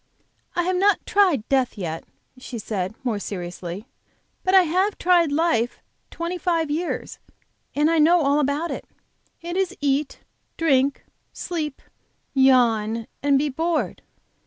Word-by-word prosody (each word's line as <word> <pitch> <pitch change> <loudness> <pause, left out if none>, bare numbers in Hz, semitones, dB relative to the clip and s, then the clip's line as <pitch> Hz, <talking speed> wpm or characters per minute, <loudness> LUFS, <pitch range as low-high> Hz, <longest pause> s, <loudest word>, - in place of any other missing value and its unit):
"I 350 - +1
have 365 +1 0
not 400 +2 +3
tried 360 - +2
death 260 -4 +1
yet," 165 -4 -4 0.3
she 255 -1 -7
said, 205 -2 -3
more 230 -5 -1
seriously; 180 0 -6 0.6
"but 375 +1 +3
I 380 - +8
have 370 +5 +1
tried 345 -4 +3
life 290 -6 +1 0.3
twenty 340 +2 -4
five 330 -3 0
years 330 +3 -3 0.6
and 295 +1 +3
I 330 0 +3
know 335 +3 +5
all 285 +1 +3
about 295 +4 0
it. - - -6 0.6
It 345 +1 -4
is 385 -1 -1
eat, 285 0 -1 0.4
drink, 275 -4 +2 0.3
sleep 310 -5 -4 0.5
yawn 230 -4 +3 0.2
and 280 -1 +3
be 290 +2 +1
bored. 320 +3 -1
290 Hz, 135 wpm, -23 LUFS, 245-345 Hz, 0.6 s, I